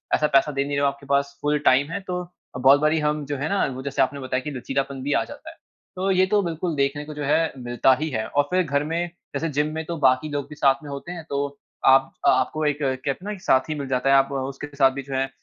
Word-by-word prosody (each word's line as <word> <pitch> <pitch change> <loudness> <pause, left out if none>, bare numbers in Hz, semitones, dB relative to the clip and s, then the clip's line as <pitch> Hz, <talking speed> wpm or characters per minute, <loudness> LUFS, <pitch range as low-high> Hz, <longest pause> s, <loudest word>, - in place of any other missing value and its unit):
ऐसा 150 - +2
पैसा 135 +2 +4
दे 140 -1 0
नहीं 145 0 -3
रहे - - +1
हो, 140 - +3
आपके 140 0 -4
पास 140 0 0
फुल 150 0 +1
टाइम 140 +4 +4
है, 200 - -2
तो 180 -2 -5 0.3
बहुत 135 +3 +6
बारी 155 +1 +3
हम 150 0 0
जो 145 0 -3
है 140 +3 -2
ना 200 0 +1
जैसे 140 +1 -1
आपने 135 +2 0
बताया 130 -1 -2
कि 150 - -4
लचीलापन 135 +1 -3
भी 145 +1 0
आ - - +2
जाता 290 +2 -10
है, 325 - -13 0.4
तो 190 +1 -1
ये 185 0 +4
तो 205 - +5
बिल्कुल 170 -1 -2
देखने 140 +1 0
को 150 - -8
जो 150 0 -5
है 160 +3 +1
मिलता 120 +1 +2
ही 155 - -1
है। 110 -6 -2
और 145 - +2
फिर 185 0 +3
घर 140 -3 0
में 160 +2 -2 0.4
जैसे 165 - -1
जिम 150 - +2
में 160 - -3
तो 170 +1 -4
बाकी 130 +4 +1
लोग 145 -1 -4
भी 150 - -9
साथ 135 0 +2
में 145 - -8
होते 140 +5 -6
हैं 170 -2 -7
तो 140 0 0 0.4
आप 135 0 +5 0.2
आपको 155 0 +2
एक 145 -1 +1
कहते 130 0 -1 0.2
हैं 210 - -3
ना 210 - -5
साथी 130 +4 +2
मिल 140 - -4
जाता 130 0 0
है, 135 - +6
आप 135 0 +3
उसके 135 +2 -4
साथ 135 -2 +5
भी 140 +1 -5
जो 135 +1 -8
है 135 0 0
140 Hz, 270 wpm, -24 LUFS, 135-155 Hz, 0.4 s, बहुत